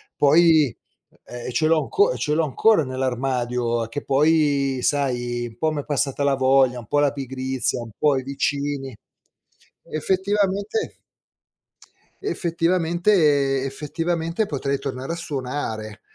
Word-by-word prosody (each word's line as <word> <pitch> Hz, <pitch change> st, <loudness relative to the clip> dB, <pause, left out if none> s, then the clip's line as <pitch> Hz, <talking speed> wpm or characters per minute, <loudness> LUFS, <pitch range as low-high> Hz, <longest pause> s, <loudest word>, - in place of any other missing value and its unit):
Poi 155 Hz, -, +4 dB, 0.5 s
ehm, 120 Hz, +1 st, -7 dB
ce 155 Hz, +6 st, +1 dB
l'ho 160 Hz, -1 st, +3 dB
anco 425 Hz, +4 st, +2 dB
ce 150 Hz, -, -1 dB
l'ho 165 Hz, +2 st, +2 dB
ancora 205 Hz, -, +3 dB
nell'armadio, 125 Hz, -3 st, -1 dB
che 130 Hz, +6 st, -6 dB
poi 140 Hz, -2 st, +2 dB
sai, 120 Hz, -4 st, -1 dB
un 115 Hz, -, -9 dB
po' 160 Hz, -, +2 dB
m'è 145 Hz, -2 st, -4 dB
passata 140 Hz, -1 st, -1 dB
la 140 Hz, -1 st, +3 dB
voglia, 130 Hz, -1 st, +3 dB
un 115 Hz, -, -12 dB
po' 145 Hz, -, 0 dB
la 145 Hz, -1 st, +3 dB
pigrizia, 130 Hz, -2 st, -2 dB
un 115 Hz, -, -10 dB
po' 145 Hz, -3 st, +2 dB
i 130 Hz, -, -3 dB
vicini. 140 Hz, -1 st, -2 dB, 0.9 s
Effettivamente 200 Hz, -, -1 dB, 1.3 s
effettivamente, 165 Hz, -, +1 dB
effettivamente 165 Hz, +7 st, -2 dB
potrei 140 Hz, -4 st, -2 dB
tornare 135 Hz, +2 st, -5 dB
a -, -, -3 dB
suonare, 125 Hz, -, -5 dB
140 Hz, 125 wpm, -23 LUFS, 130-165 Hz, 1.3 s, Poi